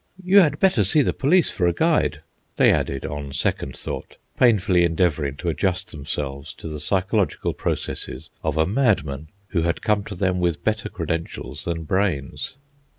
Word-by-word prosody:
"You 190 Hz, +3 st, +6 dB
had 150 Hz, -6 st, +4 dB
better 185 Hz, -, +4 dB
see 140 Hz, +10 st, +4 dB
the -, -, 0 dB
police 170 Hz, +6 st, +3 dB
for 90 Hz, -, +1 dB
a 85 Hz, -, +2 dB
guide," 155 Hz, -, +1 dB, 0.4 s
they -, -, +6 dB
added, 70 Hz, -, -1 dB
on 70 Hz, -2 st, -5 dB
second -, -, -1 dB
thought, -, -, -6 dB, 0.2 s
painfully 95 Hz, -7 st, +4 dB
endeavouring 80 Hz, -5 st, +1 dB
to 85 Hz, -, -2 dB
adjust 95 Hz, +2 st, -1 dB
themselves 70 Hz, 0 st, -5 dB
to -, -, -9 dB
the 75 Hz, -1 st, -5 dB
psychological 95 Hz, +5 st, 0 dB
processes 65 Hz, +5 st, -4 dB
of 80 Hz, -1 st, -1 dB
a 80 Hz, -, +4 dB
madman 90 Hz, -, +1 dB, 0.2 s
who 85 Hz, -, 0 dB
had 85 Hz, +1 st, -1 dB
come 105 Hz, -2 st, +2 dB
to 105 Hz, -, -6 dB
them 90 Hz, 0 st, 0 dB
with 85 Hz, -4 st, 0 dB
better 110 Hz, +1 st, 0 dB
credentials 80 Hz, -1 st, -4 dB
than 85 Hz, -1 st, -2 dB
brains. 90 Hz, -, -1 dB
90 Hz, 165 wpm, -23 LUFS, 75-105 Hz, 0.4 s, You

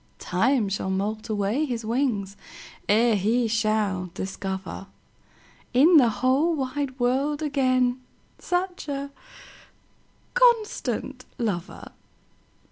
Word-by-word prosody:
Time 225 Hz, +5 st, +1 dB
shall 195 Hz, -1 st, -2 dB
moult 210 Hz, +4 st, -2 dB
away 210 Hz, +6 st, 0 dB
his 240 Hz, -6 st, -3 dB
wingsEre 220 Hz, -1 st, -1 dB
he 225 Hz, +4 st, +1 dB
shall 215 Hz, -4 st, 0 dB
discoverIn 190 Hz, 0 st, -5 dB, 0.9 s
the 280 Hz, -1 st, +6 dB
whole 265 Hz, +9 st, +1 dB
wide 270 Hz, -1 st, -3 dB
world 275 Hz, +5 st, +1 dB
againSuch 270 Hz, +6 st, -1 dB
a 280 Hz, 0 st, -4 dB, 1.2 s
constant 425 Hz, -, +1 dB
lover. 195 Hz, -7 st, -4 dB
245 Hz, 80 wpm, -25 LUFS, 205-280 Hz, 1.2 s, the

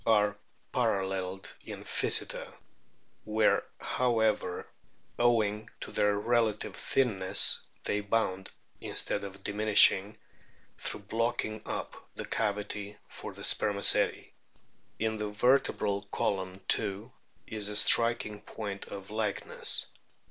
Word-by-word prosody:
29) 110 Hz, -2 st, +4 dB
are 105 Hz, -, -15 dB, 0.3 s
paralleled 95 Hz, -2 st, -2 dB
in -, -, -9 dB
Pkyseter, -, -, 0 dB, 0.7 s
where, 110 Hz, 0 st, +1 dB, 0.2 s
however, 110 Hz, -7 st, -1 dB, 0.5 s
owing 110 Hz, -3 st, +1 dB
to -, -, -8 dB
their 105 Hz, 0 st, +1 dB
relative 110 Hz, -1 st, -1 dB
thinness, 100 Hz, -8 st, +3 dB, 0.2 s
they 105 Hz, -, -1 dB
bound, 100 Hz, -3 st, -2 dB, 0.3 s
instead 100 Hz, -, -1 dB
of 100 Hz, 0 st, -9 dB
diminishing 105 Hz, -1 st, +4 dB, 0.6 s
through -, -, -3 dB
blocking 110 Hz, +1 st, -2 dB
up, -, -, -6 dB
the -, -, -6 dB
cavity 105 Hz, -1 st, -4 dB
for -, -, -9 dB
the -, -, -11 dB
spermaceti. 100 Hz, -1 st, +4 dB, 0.6 s
In 110 Hz, 0 st, -2 dB
the 105 Hz, 0 st, -3 dB
vertebral 105 Hz, -3 st, +1 dB
column 95 Hz, -1 st, -2 dB
too 105 Hz, +3 st, 0 dB, 0.3 s
is 105 Hz, -2 st, -3 dB
a 105 Hz, -, -5 dB
striking 110 Hz, -1 st, +5 dB
point 100 Hz, -3 st, -7 dB
of 100 Hz, 0 st, -9 dB
likeness. 105 Hz, -2 st, 0 dB
105 Hz, 105 wpm, -29 LUFS, 100-110 Hz, 0.7 s, striking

